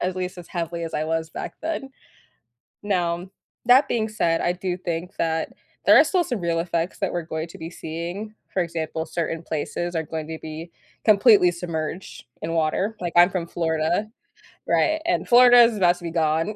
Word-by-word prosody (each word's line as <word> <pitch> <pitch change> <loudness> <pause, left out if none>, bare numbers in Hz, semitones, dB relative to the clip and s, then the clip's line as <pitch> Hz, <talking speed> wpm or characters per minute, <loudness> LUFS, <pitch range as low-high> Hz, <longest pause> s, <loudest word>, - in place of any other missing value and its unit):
at 185 +1 -2
least 185 0 -4
as 175 - -10
heavily 170 -1 -3
as 165 - -6
I 155 - 0
was 160 0 -2
back - - -6
then. 315 -4 -4 0.9
Now, 180 -3 -1 0.4
that 260 +4 +6
being 220 -3 -1
said, 170 -6 0
I 175 - +1
do 180 0 -3
think 175 0 -5
that 160 -1 -1 0.3
there - - +8
are - - +8
still 365 -3 +1
some 240 -7 -3
real 170 -1 0
effects 170 0 -2
that 195 - -1
we're 175 - -1
going 160 0 -5
to 165 - -12
be 165 0 -7
seeing, 175 +6 -6 0.2
for 185 - +1
example, 160 -1 -3
certain 165 -1 -3
places 170 +2 -3
are 160 - 0
going 155 0 -5
to 160 0 -5
be 160 +2 -7 0.4
completely 210 -3 +6
submerged 170 -1 -5 0.2
in 160 - -3
water- 165 +7 0
like, 175 -2 -4
I'm 175 +1 +7
from 180 -3 -3
Florida, 165 +4 -1 0.6
right, 315 -1 +2
and 350 - 0
Florida 245 0 +8
is 230 -2 +3
about 175 -2 +4
to 175 - -13
be 170 - -3
gone, 160 +4 0
175 Hz, 190 wpm, -23 LUFS, 165-195 Hz, 0.9 s, there